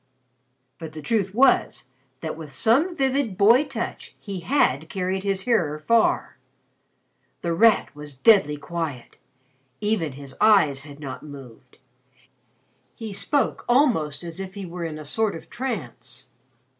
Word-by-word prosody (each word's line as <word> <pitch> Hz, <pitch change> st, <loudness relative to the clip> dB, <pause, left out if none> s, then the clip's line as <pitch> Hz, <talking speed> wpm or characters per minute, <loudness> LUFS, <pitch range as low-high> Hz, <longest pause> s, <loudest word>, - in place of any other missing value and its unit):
But 160 Hz, -2 st, -8 dB
the 155 Hz, -, -8 dB
truth 195 Hz, +1 st, -1 dB
was, 265 Hz, +2 st, +3 dB, 0.4 s
that 160 Hz, -, -4 dB
with 155 Hz, -2 st, -9 dB
some 265 Hz, -, +2 dB
vivid 265 Hz, -, 0 dB
boy 230 Hz, +8 st, +5 dB
touch 265 Hz, -5 st, -6 dB
he 195 Hz, -3 st, -6 dB
had 160 Hz, -, +1 dB
carried 190 Hz, 0 st, -2 dB
his 195 Hz, -1 st, -1 dB
hearer 185 Hz, -11 st, +1 dB
far. 225 Hz, +9 st, +1 dB, 1.0 s
The 170 Hz, -1 st, -1 dB
Rat 215 Hz, -3 st, +3 dB
was 150 Hz, -1 st, -9 dB
deadly 150 Hz, -, +4 dB
quiet. 155 Hz, -5 st, -6 dB, 0.6 s
Even 205 Hz, -9 st, -1 dB
his 135 Hz, 0 st, -9 dB
eyes 155 Hz, -10 st, +4 dB
had 145 Hz, -1 st, -12 dB
not 135 Hz, -4 st, -7 dB
moved. 135 Hz, -6 st, -13 dB, 1.2 s
He 220 Hz, -3 st, -7 dB
spoke 275 Hz, +8 st, +1 dB
almost 225 Hz, -, +2 dB
as 170 Hz, +1 st, -6 dB
if 190 Hz, 0 st, -7 dB
he 200 Hz, -2 st, -6 dB
were 175 Hz, 0 st, -6 dB
in 155 Hz, -2 st, -5 dB
a 155 Hz, -, -9 dB
sort 215 Hz, +6 st, 0 dB
of 165 Hz, -, -11 dB
trance. 135 Hz, -, -6 dB
180 Hz, 140 wpm, -24 LUFS, 150-225 Hz, 1.2 s, boy